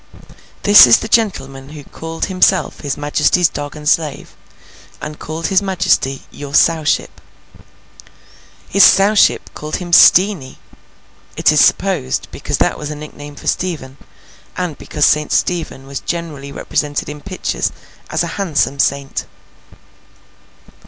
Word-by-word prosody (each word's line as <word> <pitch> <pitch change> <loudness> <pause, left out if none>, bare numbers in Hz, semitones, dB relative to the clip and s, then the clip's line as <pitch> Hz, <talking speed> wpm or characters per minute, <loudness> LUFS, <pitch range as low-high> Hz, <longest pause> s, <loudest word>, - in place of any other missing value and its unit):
This 205 -10 +9
is 115 - +6
the - - -5
gentleman 135 - -1
who 150 -1 -10
called 165 +3 -6
himself 185 0 +1
his 145 -3 -4
Majesty's 150 +4 +2
dog 145 0 -7
and 150 -1 -8
slave, 155 -2 -1 0.6
and 150 0 -8
called 160 +1 -6
his 190 - +4
Majesty 185 -8 0
Your 145 0 -7
Sowship. 160 -2 +1 1.5
His 200 - +4
Sowship 200 +2 +4
called 155 +1 -6
him 175 -2 -6
Steenie; 180 -7 +5 0.8
it - - +4
is - - +4
supposed, 65 +1 +1
because - - -4
that - - 0
was 150 - -6
a 150 - -5
nickname 145 -1 -10
for - - -13
Stephen, 150 -7 -3 0.6
and 180 -4 -3
because 150 0 -1
St. 150 0 +1
Stephen 165 -6 -1
was 135 0 -6
generally 155 -5 -6
represented 145 +1 -3
in 150 0 -8
pictures 185 +1 -3 0.4
as - - -1
a - - -5
handsome 145 -6 -1
saint. 140 0 -1
150 Hz, 130 wpm, -16 LUFS, 145-180 Hz, 1.5 s, This